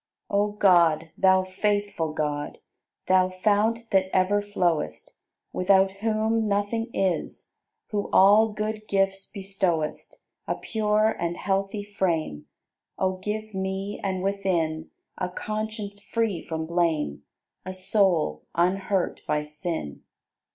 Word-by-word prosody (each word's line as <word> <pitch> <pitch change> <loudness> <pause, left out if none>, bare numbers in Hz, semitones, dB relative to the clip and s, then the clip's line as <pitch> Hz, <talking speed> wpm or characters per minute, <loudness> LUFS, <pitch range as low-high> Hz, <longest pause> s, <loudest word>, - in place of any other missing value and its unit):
81. 200 - +3
O 210 0 0
God, 170 -6 +4
Thou 190 -1 +4
faithful 200 -3 -1
God, 150 -1 -2 0.5
Thou 185 0 +4
Fount 215 +5 +1
that 190 -1 +3
ever 190 +2 +3
flowest, 175 - -1 0.4
Without 190 +1 +4
whom 220 +1 +1
nothing 205 +3 0
is, 190 -5 -2 0.3
Who 205 -1 -1
all 205 +3 +6
good 215 0 -4
gifts 195 0 0
bestowest: 190 -6 -2 0.2
A - - 0
pure 215 0 +1
and 170 0 -2
healthy 195 +1 -1
frame 165 - -2 0.5
O 185 0 0
give 215 +3 -4
me 190 +1 -3
and 190 -2 -1
within 175 -5 -1 0.3
A 180 - -1
conscience 215 0 -5
free 225 -6 -1
from 160 -1 -4
blame, 165 - 0 0.4
A 185 - -5
soul 185 - +1
unhurt 185 +2 +1
by 150 0 +1
sin. 150 - -5
190 Hz, 115 wpm, -26 LUFS, 175-205 Hz, 0.5 s, all